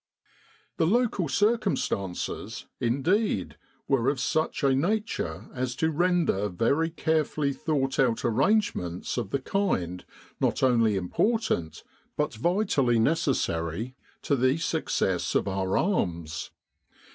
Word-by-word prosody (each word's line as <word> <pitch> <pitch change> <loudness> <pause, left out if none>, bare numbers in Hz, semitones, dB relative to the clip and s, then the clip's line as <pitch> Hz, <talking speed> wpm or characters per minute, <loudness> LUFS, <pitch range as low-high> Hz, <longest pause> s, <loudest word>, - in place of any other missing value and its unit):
The 160 - +2
local 215 -4 +1
circumstances, 195 - -1
indeed, 140 - 0 0.3
were 135 -2 +2
of 140 -2 -1
such 155 +3 0
a 135 -1 +4
nature 210 +11 -1
as 125 -1 -2
to 160 +4 +1
render 165 - +1
very 140 - +1
carefully 155 -3 0
thought 135 -2 -1
out 125 -2 +2
arrangements 120 - +1
of 95 - -2
the 140 - 0
kind 115 - -1 0.4
not - - 0
only 115 -5 +4
important, 95 - 0 0.3
but 150 -2 0
vitally 140 - +1
necessary, 115 - 0 0.3
to 140 - +2
the 130 +2 +2
success 165 - -1
of - - +2
our 95 -1 0
arms. 85 - -1
135 Hz, 110 wpm, -27 LUFS, 105-170 Hz, 0.4 s, a